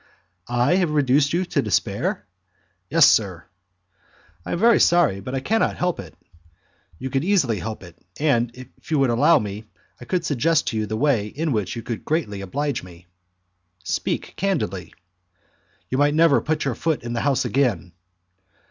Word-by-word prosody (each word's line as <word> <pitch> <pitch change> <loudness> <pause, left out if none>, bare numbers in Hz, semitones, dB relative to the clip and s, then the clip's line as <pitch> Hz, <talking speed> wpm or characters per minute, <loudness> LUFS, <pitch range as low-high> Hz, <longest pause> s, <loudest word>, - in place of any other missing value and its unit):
"I 120 +9 +2
have 180 -4 +1
reduced 145 -1 +2
you 180 +2 0
to - - 0
despair?" - - -1 0.6
"Yes, - - +6
sir." - - +2 1.0
"I - - -4
am - - -1
very 230 +5 +5
sorry, 170 - +3
but 125 +7 -6
I 130 - -2
cannot 220 +10 +1
help 180 -1 -1
it." 80 -5 -9 0.8
"You 130 +7 -6
could 135 +2 0
easily 160 - +1
help 110 +3 -6
it; 90 -1 -14 0.2
and, 125 -6 +2
if 130 0 -14
you 155 - +1
would 135 -3 +3
allow 145 +8 +5
me, 105 +1 -5 0.3
I 120 - -10
could 175 +5 -1
suggest 155 +3 +1
to 110 - -3
you 110 -1 -1
the 110 +1 -3
way 125 -6 +1
in 155 +8 -3
which 105 -6 -2
you 115 - -6
could 115 -3 -5
greatly 125 -11 -2
oblige 140 +7 -2
me." 90 -1 -14 0.8
"Speak - - -3
candidly." 100 - -2 0.9
"You 130 - -1
might 145 +1 +3
never 160 -3 +4
put 155 -1 -1
your 135 - 0
foot 155 +4 -2
in 120 0 -4
the 120 - -1
house 140 -2 +1
again." 115 -7 0
135 Hz, 175 wpm, -22 LUFS, 110-155 Hz, 1.0 s, Yes